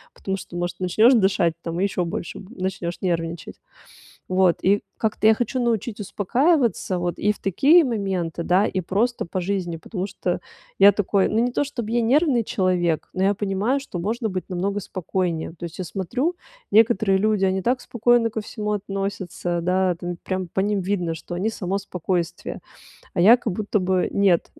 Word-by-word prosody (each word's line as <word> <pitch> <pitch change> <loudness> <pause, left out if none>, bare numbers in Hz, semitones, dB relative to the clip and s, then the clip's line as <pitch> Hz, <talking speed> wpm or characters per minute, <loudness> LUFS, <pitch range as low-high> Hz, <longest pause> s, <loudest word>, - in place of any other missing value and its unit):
потому 195 0 -3
что, 175 -2 -8
может, 175 0 -3
начнешь 215 +7 +4
дышать 190 -6 +3
там 170 0 -4
и - - +1
ещё 190 -2 0
больше 170 0 -5
бу 200 +6 -13
начнешь 185 -2 -3
нервничать. 170 -2 -3 0.7
Вот, 185 -2 +3
и 200 +2 +3 0.2
как-то 215 -1 0
я 220 - +7
хочу 245 +3 -2
научить 230 -2 -1
успокаиваться 235 - +1
вот 175 0 -2
и 210 - +2
в 210 - -16
такие 285 - +5
моменты, 190 - -2
да, 185 +4 +3
и 190 - -1
просто 220 +8 0
по 185 +2 -3
жизни, 180 -2 -2
потому 185 +2 -4
что 185 -3 -3 0.4
я 200 +1 +8
такой, 200 -1 +1
ну, 220 - 0
не 245 +1 +1
то 285 - +1
чтоб 240 -6 -5
я 235 +1 +1
нервный 260 0 +3
человек, 180 -5 0
но 185 - -1
я 200 - +3
понимаю, 205 +7 0
что 270 -9 -7
можно 220 +6 -2
быть 185 -2 -4
намного 195 +3 -1
спокойнее. 180 -4 -3
То - - -7
есть 170 -2 -7
я 185 - -3
смотрю, 245 - -2 0.3
некоторые 215 -3 +4
люди, 210 -1 +2
они 190 0 0
так 250 +5 +1
спокойно 240 0 +2
ко 220 - -3
всему 210 0 -4
относятся, 195 -3 -3
да, 185 +1 +2
там 175 0 -5
прям 185 -1 -3
по 190 - -1
ним 205 0 +1
видно, 180 -3 -1
что 165 +2 -8
они 185 +5 -1
само 195 -2 -2
спокойствие, 180 -3 -3 0.6
а 175 - +1
я 225 +7 +8
как 230 -5 -3
будто 210 +2 -1
бы 185 0 +1
нет, 195 -4 +2
195 Hz, 185 wpm, -23 LUFS, 180-220 Hz, 0.7 s, я